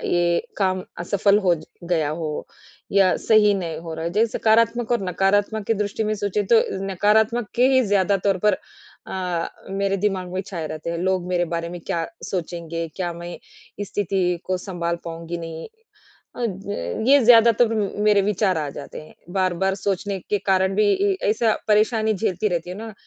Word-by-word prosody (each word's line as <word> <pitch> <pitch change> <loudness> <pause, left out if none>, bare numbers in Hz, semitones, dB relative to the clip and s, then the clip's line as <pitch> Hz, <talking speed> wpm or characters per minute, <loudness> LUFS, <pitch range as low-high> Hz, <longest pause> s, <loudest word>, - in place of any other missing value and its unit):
ये 175 -1 +2 0.2
काम 185 -2 0 0.2
असफ़ल 200 +3 +2
हो 180 -4 +3 0.3
गया 165 -4 0
हो, 155 -1 -4 0.4
या 195 -2 +4
सही 215 -2 +6
नहीं 170 -5 -3
हो 165 -1 -7
रहा 160 +1 -5
है, 170 - -2
जैसे 220 +3 +1
सकारात्मक 230 +1 +2
और 240 - +2
नकारात्मक 205 +3 +1
की 225 - +3
दृष्टि 210 +1 -2
में 215 0 0
सोचे 205 0 -1
तो 225 - +7 0.3
नकारात्मक 215 +4 +2
के 250 +2 +5
ही 260 - +5
ज़्यादा 200 0 +2
तौर 195 -2 +3
पर 210 -3 +4 0.5
अ, 180 -3 -2 0.2
मेरे 195 0 0
दिमाग 190 -2 -1
में 185 - -1
छाए 175 -5 -5
रहते 155 +1 -5
हैं, 170 - -2
लोग 185 0 0
मेरे 180 -1 +1
बारे 170 0 -2
में 175 0 -7
क्या 165 -1 -1 0.2
सोचेंगे? 170 -2 -4
क्या 175 -2 -2
मैं 170 +1 -7 0.4
इस 205 - -3
स्थिति 195 -2 -1 0.2
को 185 0 0
संभाल 175 -2 -3
पाऊँगी 165 +1 -5
नहीं? 165 -1 -7 0.7
अ, 245 - -4 0.7
ये 285 +1 +8
ज़्यादातर 230 0 +6 0.4
मेरे 205 -1 +4
विचार 195 -3 +1
आ 150 -2 -2
जाते 140 - -8
हैं, 155 - -16 0.2
बार-बार 190 0 +1
सोचने 195 0 -2
के 205 - +2
कारण 190 0 +2
भी 210 0 +3
इ 395 0 +2
ऐसा 220 +1 +2
परेशानी 215 +1 +3
झेलती 205 0 0
रहती 175 -1 -3
हूँ 185 - -7
ना, 225 0 -7
195 Hz, 175 wpm, -22 LUFS, 175-210 Hz, 0.7 s, ये